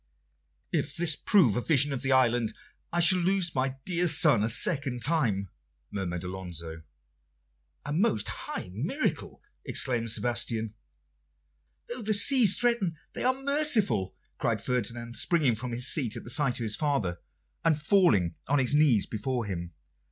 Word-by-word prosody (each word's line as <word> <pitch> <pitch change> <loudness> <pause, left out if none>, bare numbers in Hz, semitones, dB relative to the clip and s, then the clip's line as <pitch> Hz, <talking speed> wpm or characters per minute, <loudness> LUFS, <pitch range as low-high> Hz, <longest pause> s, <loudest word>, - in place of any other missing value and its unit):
"If - - -2
this 165 -3 +3
prove 155 - +3
a - - -1
vision 145 0 +3
of 135 - -3
the 135 - -1
island, 120 -3 +2 0.4
I 175 - -1
shall 175 +2 +6
lose 180 -1 0
my 130 0 -1
dear 180 -1 0
son 145 -8 +4
a 110 - 0
second 135 -1 +1
time," 115 - 0 0.4
murmured 90 -4 -4
Alonso. 85 -3 -6 1.0
"A 145 - -4
most 155 - 0
high 90 - -6
miracle!" 165 - -3 0.2
exclaimed 120 -3 0
Sebastian. 115 -1 -1 1.1
"Though 240 +1 -5
the 215 0 0
seas 225 -1 +5
threaten, 235 -9 0 0.2
they - - -4
are 260 +1 0
merciful," 275 - +1 0.2
cried - - 0
Ferdinand, 120 -1 -4
springing 155 -8 +2
from 120 +3 -5
his 120 +1 -2
seat 125 -7 +1
at - - -8
the 120 - -3
sight 135 -2 +2
of - - -3
his 110 -1 -1
father, 115 - -1 0.4
and 160 -2 +2
falling 150 - +2
on 145 - +2
his 130 0 +1
knees 145 -9 +3
before 115 +2 -3
him. 85 -4 -5
130 Hz, 150 wpm, -27 LUFS, 110-170 Hz, 1.1 s, shall